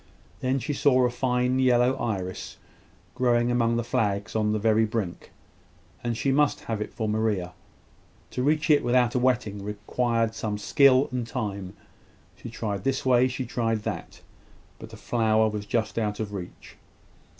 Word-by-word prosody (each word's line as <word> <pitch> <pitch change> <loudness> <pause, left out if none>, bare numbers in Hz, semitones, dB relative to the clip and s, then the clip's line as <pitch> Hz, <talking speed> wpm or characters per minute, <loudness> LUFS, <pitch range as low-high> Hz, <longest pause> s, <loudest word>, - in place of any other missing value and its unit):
Then 130 +1 0
she 140 +4 -3
saw 130 -3 +3
a 125 - +1
fine 125 +1 0
yellow 125 0 +4
iris, 95 -5 -4 0.6
growing 120 -1 +2
among 115 -1 +2
the 120 - -1
flags 105 -3 -1
on 105 -1 +1
the 110 - +1
very 110 +1 +3
brink, 105 -5 -3 0.7
and 120 -1 -2
she 135 - +1
must 145 +1 +2
have 110 -2 -4
it - - -4
for 110 - -3
Maria. 105 -4 -1 0.8
To 125 - -3
reach 155 +3 +2
it 145 - +4
without 120 -1 +2
a 125 - +1
wetting 110 -5 0
required 115 +2 -1
some 105 -2 -3
skill 130 +5 +4
and 125 -2 -3
time. 100 -6 -4 0.6
She 120 - -9
tried 105 -4 -4
this 135 0 -1
way 125 0 +4
she 130 0 -4
tried 115 -2 -1
that; - - -6 0.6
but - - -10
the - - -11
flower 110 -2 +2
was 105 -1 -4
just 110 0 -1
out 105 -2 -2
of 105 -2 -4
reach. 90 -3 -9
115 Hz, 165 wpm, -26 LUFS, 105-125 Hz, 0.8 s, yellow